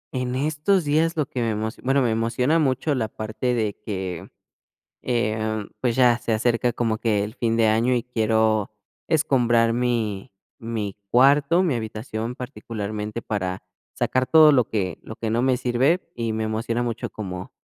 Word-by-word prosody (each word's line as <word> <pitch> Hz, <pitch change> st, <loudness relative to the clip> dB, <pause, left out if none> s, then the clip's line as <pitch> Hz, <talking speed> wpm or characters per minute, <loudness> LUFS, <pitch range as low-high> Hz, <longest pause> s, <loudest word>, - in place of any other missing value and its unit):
En 125 Hz, 0 st, -2 dB
estos 155 Hz, +6 st, +1 dB
días 160 Hz, +3 st, +1 dB
lo 150 Hz, -, +1 dB
que 125 Hz, -, -4 dB
me 115 Hz, -, 0 dB
emoci 110 Hz, +2 st, -4 dB
bueno, 135 Hz, +1 st, +2 dB
me 115 Hz, -, +1 dB
emociona 120 Hz, +8 st, +1 dB
mucho 135 Hz, +1 st, +1 dB
la 115 Hz, -5 st, -1 dB
parte 110 Hz, +3 st, -3 dB
de 110 Hz, -3 st, -1 dB
que, 95 Hz, -3 st, -5 dB, 0.7 s
em, 110 Hz, -3 st, -1 dB
pues, 120 Hz, -2 st, 0 dB
ya 125 Hz, -2 st, +5 dB
se 115 Hz, -, -2 dB
acerca 120 Hz, +2 st, +1 dB
como 115 Hz, -2 st, -1 dB
que 105 Hz, -4 st, +1 dB
el 105 Hz, -, -7 dB
fin 115 Hz, -1 st, 0 dB
de 115 Hz, -, +3 dB
año, 115 Hz, +4 st, +2 dB
y 120 Hz, -, -2 dB
quiero 110 Hz, -3 st, +1 dB, 0.4 s
escombrar 120 Hz, -6 st, +3 dB
mi 115 Hz, -5 st, -1 dB, 0.3 s
mi 110 Hz, -4 st, -4 dB
cuarto, 140 Hz, +7 st, +4 dB
mi 155 Hz, -7 st, +1 dB
habitación 110 Hz, +1 st, -4 dB
particularmente, 105 Hz, -2 st, -5 dB
para 95 Hz, -3 st, -3 dB, 0.3 s
sacar 130 Hz, 0 st, 0 dB
todo 155 Hz, -2 st, +7 dB
lo 125 Hz, -4 st, +3 dB
que 95 Hz, -5 st, -2 dB
lo 110 Hz, -, -9 dB
que 110 Hz, -1 st, -3 dB
no 120 Hz, +2 st, +1 dB
me 130 Hz, -1 st, +3 dB
sirve, 130 Hz, +8 st, +1 dB
y 115 Hz, -2 st, -2 dB
me 110 Hz, 0 st, -2 dB
emociona 115 Hz, +2 st, -1 dB
mucho 115 Hz, -2 st, -4 dB
como 90 Hz, -3 st, -7 dB
115 Hz, 170 wpm, -23 LUFS, 110-125 Hz, 0.7 s, todo